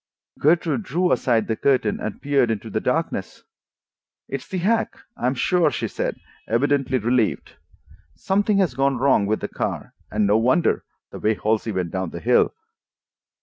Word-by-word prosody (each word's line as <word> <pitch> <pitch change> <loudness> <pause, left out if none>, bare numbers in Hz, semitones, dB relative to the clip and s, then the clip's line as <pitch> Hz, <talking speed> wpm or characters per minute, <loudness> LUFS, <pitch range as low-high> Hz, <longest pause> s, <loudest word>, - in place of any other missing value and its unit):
Gertrude 165 +5 +2
drew 180 -1 0
aside 115 -2 +2
the 110 - 0
curtain 125 -4 +1
and 110 - -5
peered 140 -4 +2
into 110 -3 -3
the - - 0
darkness. - - -2 0.8
"It's 135 -1 -5
the 190 - -4
hack, 220 +6 0 0.2
I 125 - -1
am 130 - 0
sure," 175 +6 +2
she - - -3
said, - - -3 0.3
evidently 135 +2 +1
relieved. 120 -1 0 0.6
"Something 200 - +1
has 185 -9 +2
gone 135 +1 +1
wrong 130 -6 +3
with 110 +1 0
the - - -2
car, - - -4 0.2
and 105 0 +1
no 105 +2 +4
wonder—the 130 +8 -1
way 110 +1 +1
Halsey 110 +3 0
went 90 -4 -2
down 95 -2 -2
the 85 - -7
hill." 120 +6 +3
125 Hz, 160 wpm, -22 LUFS, 110-155 Hz, 0.8 s, no